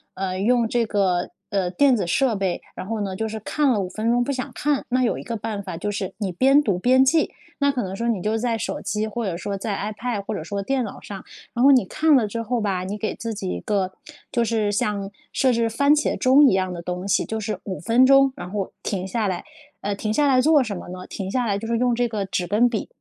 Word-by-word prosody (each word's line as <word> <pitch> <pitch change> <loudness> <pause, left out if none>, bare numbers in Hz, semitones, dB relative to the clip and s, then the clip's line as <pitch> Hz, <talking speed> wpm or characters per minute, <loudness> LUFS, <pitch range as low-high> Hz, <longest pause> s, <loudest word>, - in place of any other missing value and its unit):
呃， 185 -1 -3
用 235 +3 +3
这 235 -1 +1
个， 190 -4 +1 0.2
呃， 195 -3 0
电 265 +7 +4
子 190 -5 -2
设 255 +7 +2
备， 190 -3 -1
然 185 - -6
后 225 -1 -2
呢， 195 -2 -3
就 220 +3 -2
是 220 0 -5
看 295 +7 0
了 225 -5 +2
5 185 - -3
分 215 +4 -2
钟 245 0 +3
不 280 - -2
想 265 +1 -3
看， 290 +4 0
那 255 +1 +2
有 235 - +1
一 - - -7
个 230 - -4
办 210 -1 -4
法 185 -3 -6
就 205 +4 -2
是 195 -2 -4
你 195 -4 -2
边 270 +10 +4
读 200 -9 +1
边 255 +4 +5
记。 315 +3 +3 0.3
那 280 - +4
可 245 - -1
能 190 0 -5
说 230 +4 -2
你 220 -6 0
就 215 +4 0
在 235 0 0
手 - - -4
机 215 0 -1
或 220 +2 -3
者 185 -4 -2
说 200 +3 -4
在 200 +1 -3
ipad 215 +1 -3
或 - - -3
者 - - -4
说 200 +2 -3
电 260 +2 0
脑 200 - -8
上， 195 -2 -8 0.3
然 240 - -1
后 275 - +7
你 255 - +5
看 310 - +3
了 245 -5 +4
之 230 +3 -4
后 230 +1 -1
吧， 185 -3 -1
你 205 +2 -4
给 215 0 -2
自 230 -1 -5
己 195 - -4
一 90 - -3
个 190 - -1 0.4
就 235 -1 +1
是 220 -2 0
像 205 -1 -1 0.2
设 265 -2 +3
置 230 -1 +1
番 280 +6 +3
茄 300 - +1
钟 275 +3 +6
一 - - +2
样 185 -1 0
的 175 -1 -6
东 180 +2 -4
西， 200 - +1
就 220 - -3
是 215 0 -3
5 190 -2 -4
分 235 +7 +4
钟 275 0 +6
然 175 0 -7
后 200 -1 -3
停 190 -3 -3
下 215 +2 -1
来， 180 -2 -2 0.4
呃， 205 0 -1
停 215 +2 -2
下 295 +5 +3
来 255 - +4
做 295 +1 +5
什 210 -5 -4
么 - - -9
呢？ 185 0 -8
停 190 -2 -5
下 250 +3 0
来 200 -3 0
就 225 - -6
是 230 - 0
用 245 0 +2
这 240 +1 +1
个 215 -4 -3
纸 185 -1 -2
跟 220 +6 +3
笔， 220 -4 -3
215 Hz, 290 characters per minute, -23 LUFS, 195-245 Hz, 0.4 s, 后